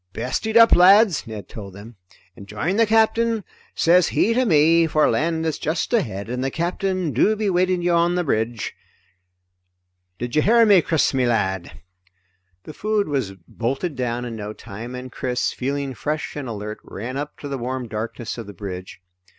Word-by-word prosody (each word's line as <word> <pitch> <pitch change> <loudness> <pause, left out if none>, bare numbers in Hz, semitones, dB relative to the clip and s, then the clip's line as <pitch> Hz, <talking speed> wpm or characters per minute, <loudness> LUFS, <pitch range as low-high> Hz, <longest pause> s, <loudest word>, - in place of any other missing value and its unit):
"Best 125 - -3
eat 220 +1 +2
up, 230 0 +7
lads," 190 - +5
Ned 105 -4 -8
told 100 -3 -9
them, 110 +4 -12 0.4
"and 100 - -12
join 145 - -2
the 230 -1 +4
Captain, 225 0 +2 0.3
sez 175 +1 +4
he 230 - +2
to 255 +2 +2
me, 165 -2 +4
for 155 -1 +3
land 160 +1 0
is 160 -2 -2
just 160 +8 -2
ahead 105 - -1
and 125 +2 -3
the 135 - 0
Captain 180 +2 -2
do 210 - +3
be 210 -2 -1
waiting 180 0 +1
you 175 - +2
on 170 +1 +2
the 180 - 0
bridge, 115 - -2 1.5
Chris, 170 - +3
me 130 -2 +1
lad." 95 -7 -2 0.8
The 155 - -10
food 210 -2 -1
was 130 -9 -2
bolted 135 +7 -3
down 125 -1 -2
in 120 -2 -6
no 105 -1 -6
time 115 +5 -9
and 125 0 -8
Chris, 125 -1 -2
feeling 140 +1 -3
fresh 150 +5 -4
and 145 -3 -5
alert, 105 -1 -6
ran 120 +6 -7
up 145 +1 -5
to 145 - -8
the 140 -2 -4
warm 125 +1 -4
darkness 115 +2 -5
of 115 - -7
the 100 - -9
bridge. 95 -1 -8
140 Hz, 175 wpm, -22 LUFS, 115-180 Hz, 1.5 s, up